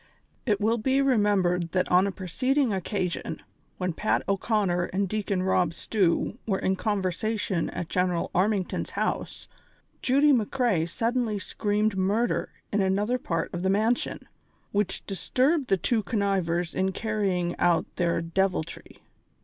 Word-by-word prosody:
|T 210 - +4
will 225 +2 +1
be 265 +5 +2
remembered, 200 -9 +2
that 185 -1 +1
on 180 +2 +5
a - - -1
preceding 255 - 0
occa 190 -2 -1
sion, - - -5 0.4
when 180 -2 -1
Pat 215 +6 0
O 195 - +3
'Conner 195 -4 0
and 195 +2 -1
Deacon 200 -2 -1
Rob 180 -3 +1
Stew 200 +4 0
were 195 -3 +1
in 190 0 0
conversation 200 -1 -1
at 175 - -5
General 180 -1 0
Armington's 195 0 0
house, - - -3 0.5
Judy 280 +3 +4
McCrea 225 -7 +1
suddenly 230 +2 0
screamed 210 +1 -1
murder 205 +6 +1 0.2
in 205 - +2
another 205 +6 +1
part 165 -7 -2
of 175 - -3
the 190 - +1
mansion, 220 +5 0 0.4
which 205 -2 -1
disturbed 255 - +1
the 195 - +3
two 225 +5 +1
connivers 190 -6 0
in 190 0 0
carrying 195 -5 -1
out 170 -2 +3
their 170 -1 +1
deviltry. 170 -1 -2
195 Hz, 140 wpm, -27 LUFS, 180-220 Hz, 0.5 s, on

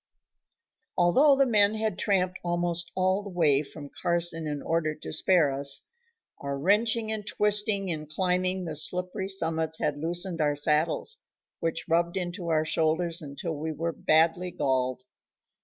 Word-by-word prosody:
Although 265 - +5
the 275 0 +3
men 210 -3 +3
had 215 -3 -2
tramped 185 -3 0
almost 175 -1 -1
all 185 +1 +1
the 205 - -8
way 155 -6 +2
from 145 -1 -10
Carson 170 -2 +1
in 145 -1 -4
order 160 -2 -1
to 155 - -8
spare 160 -2 +3
us, 140 0 0 0.6
our 140 0 -4
wrenching 220 +7 +2
and 215 -1 -3
twisting 205 0 +1
in 155 -2 -4
climbing 185 +3 -1
the 160 -2 -5
slippery 180 +5 0
summits 160 -4 -1
had 145 -1 -2
loosened 170 +1 0
our 145 -1 +1
saddles, 155 - +1 0.4
which 165 -1 -3
rubbed 170 +2 +1
into 175 -1 -4
our 155 -1 +1
shoulders 165 +2 0
until 150 +3 -5
we 155 +1 -4
were 165 +2 -3
badly 165 +4 +2
galled. 130 -5 -1
170 Hz, 150 wpm, -27 LUFS, 155-190 Hz, 0.6 s, Although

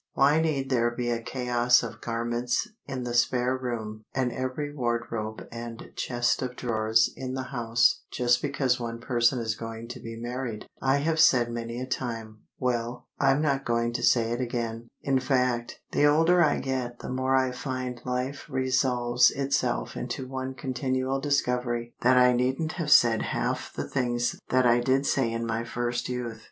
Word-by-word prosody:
"Why 145 +4 +4
need 140 -4 -1
there 120 -2 +3
be 120 0 -2
a 115 0 -1
chaos 125 0 +2
of - - -7
garments 120 +1 -1 0.2
in 130 -2 -4
the 120 -1 -3
spare 125 +1 +2
room 110 -4 -5
and 130 -2 +1
every 130 +4 -3
wardrobe 120 -4 -3
and 115 0 -8
chest 120 -1 0
of 125 -1 -3
drawers 110 -2 +2
in 130 0 -5
the 130 -1 -4
house 120 -1 +2
just 120 -1 +2
because 140 -4 0
one 115 -1 -4
person 120 +1 +2
is 115 -2 -1
going 115 +1 -7
to 125 +1 -7
be 115 -1 -7
married?" 120 -2 -4 0.2
I 135 +1 +3
have 160 0 +1
said 125 -7 +5
many 115 0 -4
a 130 - -3
time. 115 -4 -4 0.2
Well, 120 -1 -2
I'm 135 +2 +3
not 140 -2 +1
going 115 -1 0
to - - -2
say 115 -2 +3
it 120 +2 -1
again. 115 -1 -3 0.2
In 135 -1 +2
fact, 125 -3 0
the 145 - +4
older 165 +4 +5
I 150 - +3
get 125 -2 -3
the - - -6
more 130 +1 +1
I 130 -1 +2
find 125 -1 -4
life 125 +3 -3
resolves 130 -2 +3
itself 135 - -1
into 130 - -4
one 130 0 -4
continual 130 +1 -1
discovery 125 -4 0
that 125 +1 +5
I 125 0 +6
needn't 130 +6 0
have 165 -4 -3
said 115 -4 +6
half - - -2
the - - -5
things 120 -2 -1
that 130 0 +3
I 120 0 +5
did 130 +3 +2
say 130 -5 +1
in 115 0 -2
my 115 0 -1
first 120 +1 -2
youth. 120 -3 -4
125 Hz, 175 wpm, -27 LUFS, 120-130 Hz, 0.2 s, I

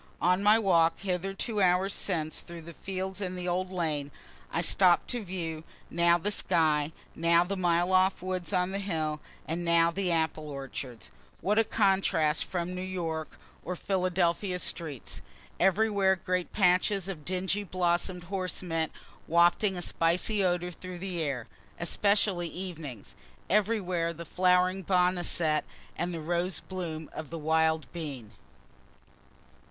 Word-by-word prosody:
On 180 +2 +3
my 210 +2 +6
walk 170 -6 +3
hither 195 0 -2
two 215 0 -1
hours 185 +2 +3
since, 160 -5 -1
through 170 -1 -10 0.2
fields 190 0 -4
and 185 -1 -3
the 180 0 -3
old 185 +1 -1
lane, 155 -6 -1 0.4
I 165 - 0
stopt 175 +1 +4
to 240 -3 -3
view, 165 -4 -4 0.3
now 170 0 +4
the 200 +5 -2
sky, 155 -6 +2 0.2
now 170 +1 +4
the 195 +3 -3
mile 175 0 +2
off 185 0 +3
woods 185 -1 -3
on 180 -1 +1
the 195 - -2
hill, 160 -6 -2 0.3
and 165 +2 -2
now 170 0 +4
the 185 0 0
apple 160 -2 0
orchards. 135 -4 -7 0.3
What 210 +3 +2
a - - +5
contrast 190 -7 +2
from 180 0 -3
New 180 - -4
York's 165 -4 -4 0.3
or 180 - -3
Philadelphia's 180 0 0
streets! 155 -7 -4 0.4
Everywhere 195 0 +3
great 180 -1 -2
patches 190 0 +2
of 175 -6 -6
dingy 190 +4 -1
blossom'd 180 -1 0
horse 185 0 -3
mint 165 -2 -1 0.4
wafting 175 +4 +3
a 175 - -3
spicy 180 +6 +1
odor 180 -1 0
through 185 +1 -8
the 180 -2 -3
air, 135 -6 -2 0.3
(especially 195 0 +2
evenings.) 165 - -7 0.4
Everywhere 185 -5 +1
the 170 +1 -8
flowering 185 +2 +2
boneset, 175 -4 +2 0.3
and 175 +1 -2
the 165 -2 -4
rose 175 +2 -1
bloom 165 -4 -5
of 155 -2 -6
the 165 - -5
wild 160 0 +2
bean. 140 -10 -6
180 Hz, 145 wpm, -29 LUFS, 165-190 Hz, 0.4 s, my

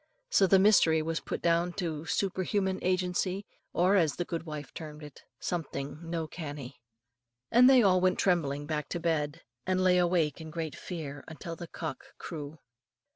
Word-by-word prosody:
So 195 - +5
the 195 - +6
mystery 185 -6 +5
was 165 +1 -1
put - - -5
down 170 +1 +2
to 165 -5 -4
super 190 +1 0
human 190 0 0
agency, 185 +1 0 0.3
or, 185 +3 +3
as 165 -6 +3
the 175 - -2
good 165 0 -4
wife 150 -1 -6
termed 155 -1 -8
it, 150 -3 -11 0.2
"something 150 -4 -4
no 165 -1 -3
canny;" 145 -6 -7 0.7
and 250 +2 +7
they 260 -3 +7
all 185 -2 +4
went 185 0 +3
trembling 145 -6 +1
back 150 -2 -3
to 175 - -2
bed, 160 -1 -1 0.3
and 185 0 +2
lay 180 -1 +5
awake 170 -4 +1
in 160 - -8
great 160 -1 -4
fear 145 -6 -6 0.2
till 170 -1 -5
the 170 0 -8
cock 160 -6 -6
crew. 150 -2 -7
170 Hz, 175 wpm, -30 LUFS, 155-185 Hz, 0.7 s, and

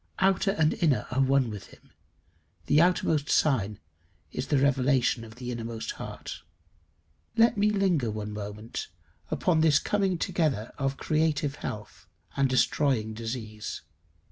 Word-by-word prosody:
Outer 195 +1 +3
and 160 -6 +2
inner 140 -10 +2
are 130 +2 +1
one 135 -3 +3
with 105 -2 -8
him: - - -20 0.7
the 150 - +5
outermost 160 -4 +2
sign 110 -9 +2 0.5
is - - -4
the 145 - +2
revelation 130 -3 +2
of 110 -1 -11
the 125 0 -5
innermost 115 -1 -4
heart. - - -7 1.0
Let 230 +1 +5
me 210 +1 +3
linger 185 - +1
one 105 0 -4
moment 105 +2 -6 0.4
upon 165 -3 +2
this 155 -3 +5
coming 195 -3 +1
together 155 - 0
of 135 0 -1
creative 155 -2 0
health 105 0 -7 0.3
and 140 -1 +2
destroying 130 -3 +2
disease. 110 -1 -5
135 Hz, 135 wpm, -28 LUFS, 115-160 Hz, 1.0 s, the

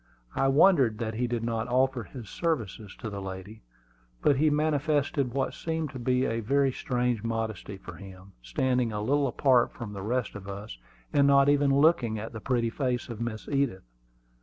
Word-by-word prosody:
I 135 - +2
wondered 135 - +5
that 110 -1 -3
he 120 +3 -1
did 120 -1 -2
not 115 -1 -1
offer 130 -1 +1
his 110 +5 -10
services 110 - -3
to 110 - -6
the 100 -1 -5
lady; 95 +3 -8 0.6
but 140 - +4
he 155 +2 +4
manifested 145 -3 +1
what 135 -1 0
seemed 160 -3 -3
to 130 - -7
be 125 +1 +1
a 115 -2 -1
very 135 +4 +2
strange 125 -3 -1
modesty 110 -3 -3
for 90 -3 -10
him, 95 0 -12
standing 125 - 0
a 105 - -3
little 140 +4 +2
apart 125 -1 +3
from 115 -4 -7
the 100 - -6
rest 120 +4 -1
of 100 -2 -9
us, 100 - -7 0.3
and 140 -1 +5
not 140 0 +5
even 145 -1 +3
looking 135 -6 +3
at 110 +3 -6
the 110 - -7
pretty 120 -3 0
face 125 -2 -2
of 115 -1 -6
Miss 115 -2 -4
Edith. 135 -9 0
120 Hz, 185 wpm, -28 LUFS, 110-140 Hz, 0.6 s, wondered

